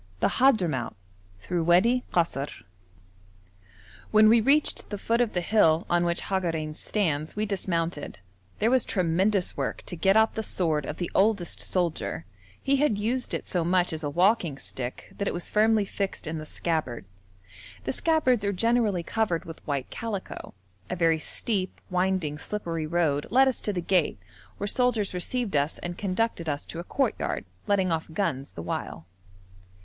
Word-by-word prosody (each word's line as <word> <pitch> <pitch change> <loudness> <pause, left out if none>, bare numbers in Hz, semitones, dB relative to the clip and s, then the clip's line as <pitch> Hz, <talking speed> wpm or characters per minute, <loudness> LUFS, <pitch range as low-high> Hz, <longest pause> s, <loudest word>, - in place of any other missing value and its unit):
26.] - - +1
CHAPTER 255 -7 +5 0.2
IX - - -10 0.5
THROUGH 175 - -1
WADI 215 +10 +4
KASR 155 -5 -1 1.5
When 215 0 +6
we 230 +1 +6
reached 285 +6 +2
the 205 - -4
foot 230 +4 +1
of 235 -3 0
the 180 - 0
hill 170 -4 +3
on 175 0 +3
which 170 0 0
Hagarein 165 -5 -2
stands 155 -4 -1
we 210 +1 0
dismounted; 170 - -2 0.4
there 225 - +2
was 260 -2 +4
tremendous 185 +2 +1
work - - -3
to - - -5
get 195 +5 +3
out 220 0 +4
the 220 - -2
sword 160 -8 -1
of - - -5
the 175 - -3
oldest 200 -4 +2
soldier; 160 - -1 0.3
he 275 +1 +1
had 270 -7 +2
used 240 +5 -1
it - - -5
so 175 -2 0
much 180 0 +2
as 160 - -4
a 145 - -1
walking 175 -2 +2
stick 125 -2 -7
that 200 - -1
it - - -1
was 175 - -3
firmly 215 0 +3
fixed 195 -1 -3
in 160 0 -3
the 155 - -8
scabbard. 155 - -2 0.8
The 130 - -2
scabbards 260 - +2
are 200 - +1
generally 215 -2 +1
covered 190 -3 -1
with 165 -1 -10
white 140 -3 -2
calico. 210 - -5 0.3
A - - -2
very 165 -2 +2
steep, 190 +4 -1
winding, 180 -5 0
slippery 165 -6 -3
road 155 -4 +1
led 265 +3 +5
us 260 - -1
to 210 - -1
the 180 -3 -2
gate, 175 -2 +1 0.4
where 205 - -3
soldiers 220 -2 +2
received 205 +3 -1
us 145 +2 +1
and 175 0 -5
conducted 190 -3 -1
us 145 -1 -3
to 165 - -7
a - - -4
courtyard, 270 +8 -1 0.2
letting 190 -3 +2
off 160 -1 -1
guns 160 -6 -2
the 85 - -7
while. 80 -1 -4
185 Hz, 170 wpm, -27 LUFS, 165-215 Hz, 1.5 s, When